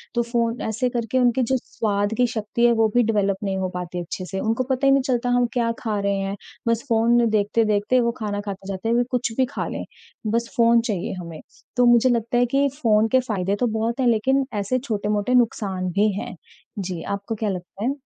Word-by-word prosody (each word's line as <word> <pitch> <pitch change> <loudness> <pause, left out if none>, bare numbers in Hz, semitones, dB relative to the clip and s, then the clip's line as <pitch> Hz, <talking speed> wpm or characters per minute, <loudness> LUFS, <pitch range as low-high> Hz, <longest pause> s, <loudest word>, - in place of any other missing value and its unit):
तो 235 - +3
फ़ोन 235 0 -1
ऐसे 225 +4 -1
करके 240 +1 -1
उनकी 245 +1 +3
जो 260 +3 +1
स्वाद 205 -3 -2
की 250 - +3
शक्ति 230 0 -1
है 240 - +6
वो 225 -1 +3
भी 245 - +5
डेवलप 205 -3 +1
नहीं 195 -1 -1
हो 190 -1 -1
पाती 180 0 -4
अच्छे 180 +2 -6
से, 190 +1 -4
उनको 225 +4 0
पता 265 +1 +1
ही - - +6
नहीं 275 0 +4
चलता 245 -2 0
हम 245 0 +3
क्या 235 -2 +1
खा 215 -3 -2
रहे 200 0 0
हैं, 195 +1 -2 0.3
बस 230 0 +1
फ़ोन 230 +1 +3
में 235 -1 +3
देखते-देखते 215 +2 +2
वो 235 -1 +2
खाना 205 -2 -2
खाते 195 -1 -6
जाते 195 +3 -3
हैं 230 - +2
वे 240 - +3
कुछ 245 -2 0
भी 260 - +4
खा - - -3
लें, - - -4 0.4
बस 230 +2 0
फ़ोन 235 0 +5
चाहिए 210 -6 -3
हमें। 170 -3 -8 0.4
तो 245 - +5
मुझे 240 +1 +5
लगता 235 0 0
है 245 - +4
कि 280 +1 +4 0.2
फ़ोन 215 -1 +4
के 260 - +5
फायदे 195 -2 0
तो 245 - +2
बहुत 225 +3 -2
हैं 255 - +2
लेकिन 265 +4 +2
ऐसे 255 +6 0
छोटे-मोटे 210 -1 -1
नुकसान 195 -6 +1
भी 205 +3 +2
हैं। - - -6 0.4
जी, 180 -3 -4
आपको 200 +2 -4
क्या 215 -1 -2
लगता 185 +2 -6
है? 270 +3 0
225 Hz, 225 wpm, -23 LUFS, 200-240 Hz, 0.4 s, है